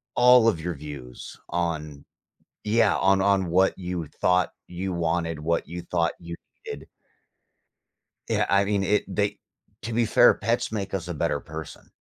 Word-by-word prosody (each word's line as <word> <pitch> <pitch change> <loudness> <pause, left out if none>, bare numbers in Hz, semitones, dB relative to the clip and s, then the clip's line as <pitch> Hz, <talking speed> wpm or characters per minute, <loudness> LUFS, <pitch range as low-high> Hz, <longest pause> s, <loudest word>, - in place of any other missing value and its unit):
all 125 -1 +6
of 100 -8 +2
your 85 -1 -3
views 70 -4 -9
on 75 -4 -3 0.6
Yeah, 110 -1 +3
on 95 0 +3
on 100 -2 +2
what 95 +2 +3
you 90 -3 -4
thought 90 +4 +1 0.2
you 90 +1 -4
wanted, 85 -2 -1
what 85 +2 -1
you 85 +1 -6
thought 85 -1 0
you 85 0 -7 0.3
did - - -8 1.4
Yeah, - - +1
I 100 0 +3
mean, 100 -1 0
it 105 +2 +2
they 100 +1 -1 0.5
To 115 +1 -4
be 115 0 +2
fair, 120 +3 +6
pets 115 +1 -1
make 100 -3 -4
us 90 -3 -3
a 90 - -3
better 75 - -1
person. 80 +1 -10
90 Hz, 160 wpm, -25 LUFS, 85-100 Hz, 1.4 s, all